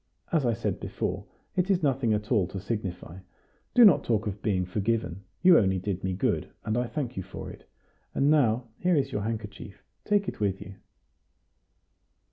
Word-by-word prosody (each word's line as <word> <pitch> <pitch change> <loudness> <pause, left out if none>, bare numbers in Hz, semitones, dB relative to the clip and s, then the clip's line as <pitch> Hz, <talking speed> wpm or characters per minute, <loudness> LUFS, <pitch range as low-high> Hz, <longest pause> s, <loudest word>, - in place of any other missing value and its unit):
As 150 -7 +2
I 120 - +2
said 105 - -2
before, - - -3 0.3
it 185 +1 +1
is 185 -4 +2
nothing 135 -5 +2
at 105 +2 -1
all 105 -7 +3
to 95 - -6
signify. 95 -4 -5 0.6
Do 245 - +9
not 190 -8 +6
talk 110 -2 0
of 105 -1 -4
being 95 -4 0
forgiven; 100 -1 -1 0.2
you 180 -2 +8
only 95 -2 +2
did 95 0 -3
me 95 0 -1
good, 95 - 0 0.2
and 110 - 0
I 120 0 0
thank 125 +1 -4
you - - -1
for - - -8
it. - - -15 0.5
And 140 - +2
now, 120 -5 +3
here 180 -1 +2
is 135 -2 +1
your 105 - -2
handkerchief; 105 -2 -6 0.2
take 205 -2 +1
it - - -5
with 100 -2 0
you." 100 - -9
110 Hz, 185 wpm, -28 LUFS, 100-135 Hz, 0.6 s, Do